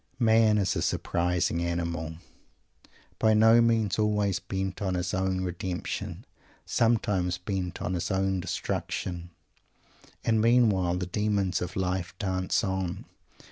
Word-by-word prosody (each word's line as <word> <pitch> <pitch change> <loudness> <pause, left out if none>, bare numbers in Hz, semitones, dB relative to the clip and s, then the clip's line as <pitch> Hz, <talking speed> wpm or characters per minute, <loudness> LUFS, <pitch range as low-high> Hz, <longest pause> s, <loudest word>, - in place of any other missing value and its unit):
Man 110 -3 +4
is 100 -3 +1
a - - -1
surprising 90 -1 0
animal; 85 -2 -2 1.0
by 110 -1 +4
no 110 +2 +6
means 110 -4 +2
always 105 -3 +1
bent 95 0 -4
on 95 -2 0
his 90 0 -2
own 95 0 0
redemption; 90 0 -4 0.4
sometimes 100 -6 +1
bent 90 -1 -4
on 90 - -1
his 85 - -2
own 95 -1 0
destruction! 90 -1 -3 0.9
And 110 -1 +2
meanwhile 105 -7 +3
the 90 - -2
demons 100 -1 0
of 90 0 -4
life 90 -1 -2
dance 95 -1 0
on. 95 -3 -2
95 Hz, 125 wpm, -28 LUFS, 90-105 Hz, 1.0 s, no